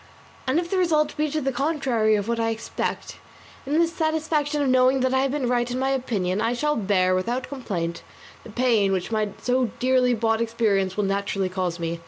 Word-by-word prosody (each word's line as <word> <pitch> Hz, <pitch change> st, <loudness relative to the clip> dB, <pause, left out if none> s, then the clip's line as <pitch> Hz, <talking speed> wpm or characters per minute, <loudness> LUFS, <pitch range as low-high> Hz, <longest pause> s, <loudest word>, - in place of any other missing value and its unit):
And 265 Hz, +5 st, +2 dB
if 345 Hz, 0 st, -5 dB
the 380 Hz, -, +1 dB
result 305 Hz, -4 st, +2 dB
be 305 Hz, 0 st, 0 dB
the 290 Hz, -2 st, -1 dB
contrary 255 Hz, -6 st, +1 dB
of 205 Hz, 0 st, -2 dB
what 235 Hz, 0 st, -1 dB
I 225 Hz, 0 st, +1 dB
expect, 225 Hz, 0 st, -4 dB, 0.5 s
in 295 Hz, +3 st, +1 dB
the 335 Hz, 0 st, +4 dB
satisfaction 315 Hz, -2 st, -1 dB
of -, -, 0 dB
knowing 255 Hz, +1 st, +4 dB
that 260 Hz, 0 st, +1 dB
I 260 Hz, -, +3 dB
have 270 Hz, -, +1 dB
been 270 Hz, -2 st, -1 dB
right 240 Hz, 0 st, +1 dB
in 245 Hz, -, -3 dB
my 265 Hz, +1 st, 0 dB
opinion, 210 Hz, -8 st, -1 dB
I 230 Hz, +2 st, +1 dB
shall 300 Hz, +4 st, 0 dB
bear 190 Hz, -3 st, +2 dB
without 240 Hz, +8 st, -1 dB
complaint 175 Hz, -11 st, -4 dB, 0.4 s
the -, -, -11 dB
pain 220 Hz, -4 st, +2 dB
which 185 Hz, +3 st, -2 dB
my 215 Hz, -1 st, 0 dB
so 255 Hz, 0 st, +2 dB
dearly 250 Hz, -1 st, +2 dB
bought 225 Hz, 0 st, +1 dB
experience 210 Hz, -5 st, 0 dB
will 210 Hz, -, +1 dB
naturally 195 Hz, -1 st, -1 dB
cause 180 Hz, -2 st, -2 dB
me. 170 Hz, 0 st, -3 dB
245 Hz, 205 wpm, -24 LUFS, 205-275 Hz, 0.5 s, the